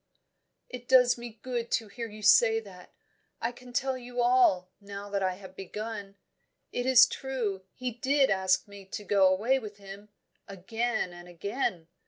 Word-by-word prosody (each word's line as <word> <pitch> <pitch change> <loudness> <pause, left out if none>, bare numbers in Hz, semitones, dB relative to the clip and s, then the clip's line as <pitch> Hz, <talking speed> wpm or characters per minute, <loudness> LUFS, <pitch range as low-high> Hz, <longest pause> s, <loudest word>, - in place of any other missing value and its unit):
"It 250 -1 -9
does 250 -1 +6
me 235 -2 -9
good 240 -2 -3
to 225 - 0
hear 230 +3 -6
you 215 0 -11
say 225 +2 +6
that! 190 -5 -13 0.5
I 230 - -1
can 245 +1 -14
tell 260 +2 0
you 245 -1 -7
all, 240 -7 +3
now 200 0 -9
that 200 -1 -1
I 185 -1 0
have 190 -1 -13
begun. 205 +1 -6 0.6
It 245 +1 -2
is 260 -2 +8
true, 225 -8 -4
he 255 -1 -3
did 265 +3 +2
ask 190 0 +2
me 200 -1 -12
to 210 +2 -7
go 200 -1 +4
away 220 +9 +2
with 210 -4 -9
him, 200 +1 -11 0.4
again 220 +1 -2
and 175 0 -12
again. 180 -1 -3
215 Hz, 170 wpm, -29 LUFS, 195-245 Hz, 0.6 s, is